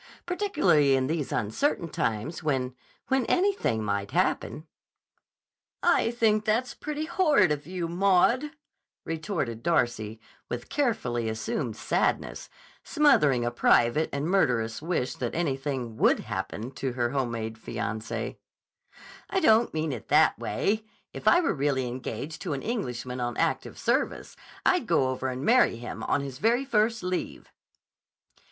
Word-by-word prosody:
"Particularly 350 - +3
in 130 -1 +1
these 155 0 -2
uncertain 170 - 0
times 115 +1 -2
when—when 135 - -2
anything 365 - +1
might 100 -1 -2
happen." 155 - -1 1.2
"I - - +3
think 220 -3 +2
that's 230 +4 0
pretty 305 0 -4
horrid 305 - +3
of 150 0 -3
you, 180 -2 -3
Maud," 195 - +3 0.6
retorted 155 - -3
Darcy 120 -9 0 0.3
with 120 0 -5
carefully 125 - 0
assumed 110 +2 -3
sadness, - - -1 0.3
smothering 150 - +3
a 120 - 0
private 120 +5 +3
and 140 +1 -2
murderous 120 -12 +1
wish 160 -6 -1
that 120 -2 -3
"anything" 135 -7 -2
would - - +3
happen 115 +5 -5
to 135 -2 -3
her 120 -1 0
home 135 -3 0
made 110 -1 -4
fiancé. 115 -1 -4 0.9
"I 385 - +1
don't 230 -8 +4
mean 155 -1 -2
it 115 - -8
that - - +4
way. 195 - 0
But 220 0 -24 0.3
if - - -8
I 350 - +6
were - - +1
really 135 -3 0
engaged 130 +4 -5
to 175 -5 -2
an 135 - -4
Englishman 125 - -3
on 120 0 -2
active - - -1
service, - - -1 0.3
I'd - - +3
go 130 - +3
over 130 0 -2
and 130 +1 -4
marry 245 - +5
him, 120 +1 -7
on - - +1
his 135 -1 -7
very 235 - +2
first 225 -3 +1
leave." 180 0 -4
145 Hz, 140 wpm, -27 LUFS, -, 1.2 s, I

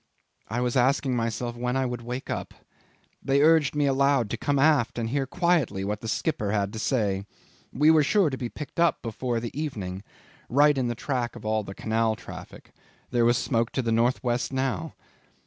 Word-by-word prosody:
I 115 +3 -1
was 125 0 -1
asking 130 +1 +2
myself 115 +1 -2
when 125 +2 -1
I 135 - +1
would 125 -1 -4
wake 125 +2 -5
up. - - -5 0.7
They 140 +1 +2
urged 155 -3 +4
me 145 -1 +2
aloud 135 -4 +2
to - - 0
come 145 +4 0
aft 140 -5 +3
and 115 -1 -2
hear 135 +1 -1
quietly 165 - +1
what 105 +1 -3
the 115 - -6
skipper 105 -3 -1
had 100 -1 -1
to 110 - -5
say. 105 -5 0 0.4
We 150 +4 +4
were 160 -1 +5
sure 170 +2 +3
to - - -2
be 125 -2 -4
picked 150 +5 -8
up 170 0 +2
before 120 +1 -2
the 115 +1 -6
evening 100 -12 -4 0.5
right 145 +4 +5
in 130 -2 0
the 120 - -2
track 125 -1 -2
of 120 - -10
all 110 0 0
the 95 -1 -8
Canal 110 0 0
traffic; - - -11 0.4
there 120 -1 +3
was 120 +1 +4
smoke 115 -3 0
to 130 - -1
the 115 - -1
north 120 +4 +2
west 120 0 -1
now. 130 -11 -2
125 Hz, 200 wpm, -26 LUFS, 115-140 Hz, 0.7 s, were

